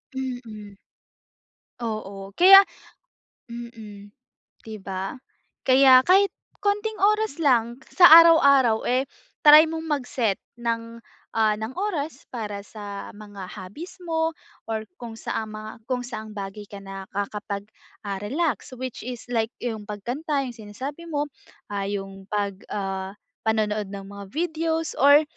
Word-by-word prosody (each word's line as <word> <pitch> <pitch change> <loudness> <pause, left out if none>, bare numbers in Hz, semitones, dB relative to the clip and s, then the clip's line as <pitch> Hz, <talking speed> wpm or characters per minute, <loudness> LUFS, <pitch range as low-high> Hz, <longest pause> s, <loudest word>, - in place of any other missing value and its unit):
Mm. 240 -6 -6 1.1
Oo. 200 -3 -5
Kaya 380 - +10 0.9
mm, 220 -4 -9 0.5
'di 220 -1 -7
ba? 190 0 -4 0.5
Kaya 260 -1 +7
kahit 390 +3 +5 0.3
konting 415 +2 0
oras 425 -1 +2
lang 240 -4 +2
sa 360 - +6 0.2
araw-araw, 280 -9 +5
eh, 255 +2 +1 0.3
try 300 +1 +9
mong 320 0 -5
mag-set 245 -6 -1 0.2
ng, 230 0 -3 0.3
ah, 220 -1 +3
ng 220 +4 -5
oras 320 -7 -3
para 210 -4 -5
sa 205 -1 -8
mga 205 -3 -9
hobbies 205 - -9
mo 325 -1 +1 0.4
or 220 -1 -2 0.2
kung 230 -2 -7
sa, 225 - -3
ah, 220 - -7
mga 215 +1 -9 0.2
saang 220 -3 -7
bagay 200 +1 -6
ka 200 - -8
nakakapag 200 +1 -5 0.4
ah 200 -1 -3
relax. 270 - -2
Which 255 -1 -5
is 245 0 -6
like 225 -1 0
'yung 220 -4 -4
pagkanta 270 - -2
'yung 245 -2 -7
sinasabi 260 +10 -7
mo. 295 -2 -2 0.4
Ah, 200 -1 -2
'yung 195 -1 -6
pag 200 -2 -2
ah, 195 -1 -3 0.3
panonood 215 -2 0
ng 195 0 -7
mga 200 0 -9
videos 325 -1 -1
or 285 +3 +7
230 Hz, 130 wpm, -24 LUFS, 205-285 Hz, 1.1 s, Kaya